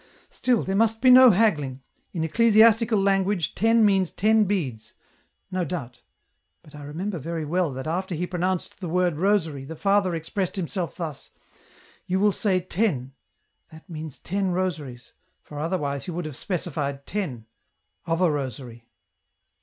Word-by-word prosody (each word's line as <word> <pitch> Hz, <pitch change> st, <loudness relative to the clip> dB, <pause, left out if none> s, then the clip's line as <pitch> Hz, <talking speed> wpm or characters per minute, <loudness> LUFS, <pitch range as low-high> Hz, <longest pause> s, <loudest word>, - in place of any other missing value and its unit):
"Still, 245 Hz, -4 st, +1 dB
there 190 Hz, -, -2 dB
must 225 Hz, +1 st, +2 dB
be 255 Hz, +2 st, +6 dB
no 255 Hz, 0 st, +9 dB
haggling; 150 Hz, -, +1 dB, 0.3 s
in 165 Hz, -4 st, -3 dB
ecclesiastical 225 Hz, +4 st, +4 dB
language 195 Hz, -2 st, +1 dB
• -, -, -29 dB
ten 225 Hz, +2 st, +3 dB
• -, -, +6 dB
means 195 Hz, -4 st, +3 dB
ten 215 Hz, +1 st, +3 dB
beads; 130 Hz, -, -3 dB, 0.6 s
no 185 Hz, -1 st, -1 dB
doubt... 130 Hz, -8 st, -6 dB, 0.6 s
but 150 Hz, -, -18 dB
I 150 Hz, -, -10 dB
remember 175 Hz, +5 st, -4 dB
very 165 Hz, +2 st, -4 dB
well 170 Hz, 0 st, 0 dB
that 130 Hz, +1 st, -6 dB
after 180 Hz, +3 st, -2 dB
he 175 Hz, +3 st, -2 dB
pronounced 180 Hz, +1 st, -2 dB
the 180 Hz, -4 st, -5 dB
word 175 Hz, -2 st, +1 dB
rosary, 165 Hz, -7 st, +1 dB
the 160 Hz, +4 st, -8 dB
father 195 Hz, 0 st, +1 dB
expressed 180 Hz, +3 st, -3 dB
himself 180 Hz, -1 st, -3 dB
thus: 160 Hz, -6 st, -6 dB, 0.4 s
' -, -, -28 dB
you 185 Hz, +1 st, 0 dB
will 205 Hz, +1 st, +4 dB
say 190 Hz, -1 st, +1 dB
ten,' 170 Hz, -, -1 dB, 0.6 s
that 160 Hz, 0 st, -15 dB
means 155 Hz, -4 st, -7 dB
ten 195 Hz, +1 st, -2 dB
rosaries, 160 Hz, -9 st, -4 dB, 0.3 s
for 150 Hz, -, -9 dB
otherwise 150 Hz, -4 st, -2 dB
he -, -, -6 dB
would 175 Hz, 0 st, -4 dB
have 155 Hz, -3 st, -6 dB
specified 140 Hz, -6 st, -4 dB
ten... 150 Hz, -, -4 dB, 0.6 s
of 165 Hz, +1 st, 0 dB
a 175 Hz, -3 st, +4 dB
rosary." 125 Hz, -4 st, -6 dB
180 Hz, 160 wpm, -25 LUFS, 150-200 Hz, 0.6 s, no